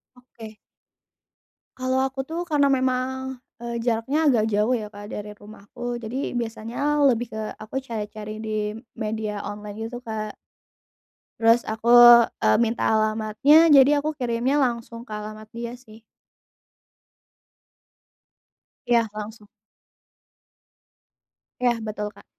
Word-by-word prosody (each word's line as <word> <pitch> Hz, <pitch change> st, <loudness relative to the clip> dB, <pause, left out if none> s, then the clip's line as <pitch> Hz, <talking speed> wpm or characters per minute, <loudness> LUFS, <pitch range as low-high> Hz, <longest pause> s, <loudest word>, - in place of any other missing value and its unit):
Oke. 230 Hz, -3 st, -13 dB, 1.2 s
Kalau 260 Hz, 0 st, 0 dB
aku 270 Hz, 0 st, -2 dB
tuh, 325 Hz, +4 st, -4 dB
karena 290 Hz, -2 st, +3 dB
memang, 260 Hz, 0 st, -1 dB, 0.2 s
eee, 235 Hz, 0 st, -4 dB
jaraknya 245 Hz, +7 st, 0 dB
agak 230 Hz, -5 st, +3 dB
jauh 210 Hz, +4 st, +1 dB
ya, 220 Hz, -4 st, -2 dB
Kak 205 Hz, 0 st, -11 dB
dari 210 Hz, 0 st, -6 dB
rumahku. 220 Hz, +3 st, -7 dB
Jadi, 245 Hz, +5 st, -4 dB
biasanya 235 Hz, +6 st, -2 dB
lebih 245 Hz, -3 st, +2 dB
ke 220 Hz, -, -4 dB, 0.2 s
aku 215 Hz, +5 st, -6 dB
cari-cari 215 Hz, -2 st, -6 dB
di 215 Hz, -1 st, -2 dB, 0.2 s
media 215 Hz, -2 st, -3 dB
online 205 Hz, 0 st, -7 dB
gitu, 240 Hz, +2 st, -6 dB
Kak. 215 Hz, -3 st, -5 dB, 1.1 s
Terus 230 Hz, +1 st, +4 dB
aku, 220 Hz, +2 st, -5 dB, 0.6 s
eee, 110 Hz, -, +4 dB
minta 235 Hz, 0 st, 0 dB
alamatnya. 220 Hz, +9 st, +4 dB
Jadi, 280 Hz, +1 st, +7 dB
aku 295 Hz, +2 st, 0 dB
kirimnya 255 Hz, 0 st, 0 dB
langsung 235 Hz, -2 st, -2 dB
ke 215 Hz, -, -8 dB
alamat 215 Hz, +1 st, -8 dB
dia 235 Hz, 0 st, -5 dB
sih. 220 Hz, -3 st, -17 dB, 2.8 s
Iya, 235 Hz, -2 st, +3 dB
langsung. 210 Hz, 0 st, -8 dB, 2.1 s
Iya 245 Hz, -1 st, +3 dB
betul, 210 Hz, 0 st, -4 dB
Kak. 200 Hz, -, -17 dB
230 Hz, 115 wpm, -24 LUFS, 215-255 Hz, 2.8 s, Jadi